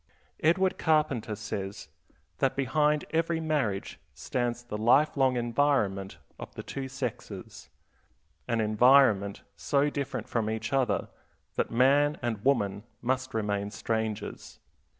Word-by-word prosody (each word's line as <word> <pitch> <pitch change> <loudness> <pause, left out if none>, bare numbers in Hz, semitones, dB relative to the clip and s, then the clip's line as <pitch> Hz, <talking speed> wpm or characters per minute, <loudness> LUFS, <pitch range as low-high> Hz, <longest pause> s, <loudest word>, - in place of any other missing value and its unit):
Edward 185 +4 +2
Carpenter 145 -9 +1
says 100 -3 -5 0.5
that 135 -2 +1
behind 150 +2 +1
every 165 0 +1
marriage 145 -11 -1 0.2
stands 120 - -2
the 120 -3 -6
life 130 +7 +4
long 130 -2 +2
environment 115 -6 0 0.2
of - - -8
the - - -6
two 135 -1 -5
sexes; 130 -4 -6 0.8
an 115 -2 +1
environment 110 -2 +4
so 145 0 +1
different 140 -2 -4
from 110 -2 -1
each 110 +1 -3
other 135 -2 +1 0.4
that - - -1
man 140 +5 +3
and 110 -4 -2
woman 105 -8 +1 0.2
must 130 0 -1
remain 100 -2 -1
strangers. 110 -1 -4
125 Hz, 120 wpm, -28 LUFS, 110-140 Hz, 0.8 s, life